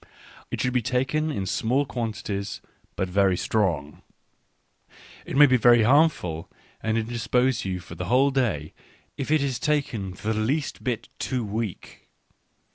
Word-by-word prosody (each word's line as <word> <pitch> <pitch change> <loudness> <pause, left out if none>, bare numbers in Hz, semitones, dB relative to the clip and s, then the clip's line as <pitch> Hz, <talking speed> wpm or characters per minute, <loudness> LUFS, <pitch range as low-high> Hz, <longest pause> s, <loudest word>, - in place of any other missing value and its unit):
It - - -4
should 125 - 0
be 125 - +2
taken 130 +6 0
in. 100 -11 -2
small 125 +9 +1
quantities, 110 -5 -4 0.4
but 95 - -1
very 95 0 +2
strong. 85 -11 -1 1.3
It - - -3
may 145 - +9
be 130 -2 +4
very 120 -1 +6
harmful, 130 - +2 0.3
and 110 0 0
indis 115 0 -3
pose 125 -2 +2
you 95 -1 -2
for 90 - -11
the 90 - -5
whole 130 +8 +3
day, 105 - -1 0.4
if 135 - -4
it 155 -1 +3
be 140 -1 0
taken 130 -9 -1
the 110 +3 -2
least 130 +8 -1
bit 120 -3 -3
too 125 -3 -2
weak. 105 -2 -5
115 Hz, 150 wpm, -25 LUFS, 100-130 Hz, 1.3 s, may